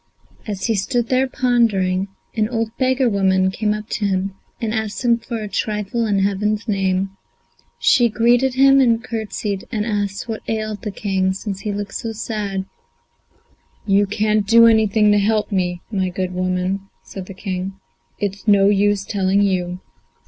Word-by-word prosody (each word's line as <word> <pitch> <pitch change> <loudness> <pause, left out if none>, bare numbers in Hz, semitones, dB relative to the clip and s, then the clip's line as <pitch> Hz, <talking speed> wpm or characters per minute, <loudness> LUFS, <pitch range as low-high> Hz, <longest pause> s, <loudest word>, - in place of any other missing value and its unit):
As 200 -3 -3
he 230 - +2
stood 230 +4 -1
there 260 +1 +2
pondering, 210 -8 +1 0.3
an 215 -1 +1
old 225 -2 -2
beggar 260 0 +2
woman 190 -3 +2
came 210 +2 -1
up 210 0 -3
to 210 - -2
him 190 0 -1 0.3
and 225 -2 -2
asked 220 +1 -3
him 235 -1 +4
for 235 0 -5
a - - -4
trifle 210 +2 -2
in 205 -2 +1
heaven's 210 +3 0
name. 195 -2 0 0.7
She 240 -5 +4
greeted 240 +4 +2
him 275 +1 +6
and 235 -3 +3
curtsied, 215 -4 -4
and 210 -3 -1
asked 205 -1 -2
what 225 -2 -4
ailed 215 -2 -3
the 210 - -4
King, 190 -2 -1
since 195 0 -5
he 210 - -3
looked 205 -1 -5
so 225 -1 -4
sad. 210 -3 -3 1.2
"You 200 0 +3
can't 210 0 +1
do 230 +2 +7
anything 220 -2 +4
to 205 - +4
help 215 +1 +1
me, 180 -2 -1
my 190 -3 0
good 185 0 -3
woman," 185 +2 -2
said 190 -2 -8
the 195 - -9
King; 185 0 -4 0.4
"it's 200 +1 -4
no 200 -1 +5
use 205 -1 +2
telling 200 -1 +1
you." 180 -2 -1
205 Hz, 165 wpm, -20 LUFS, 195-225 Hz, 1.2 s, do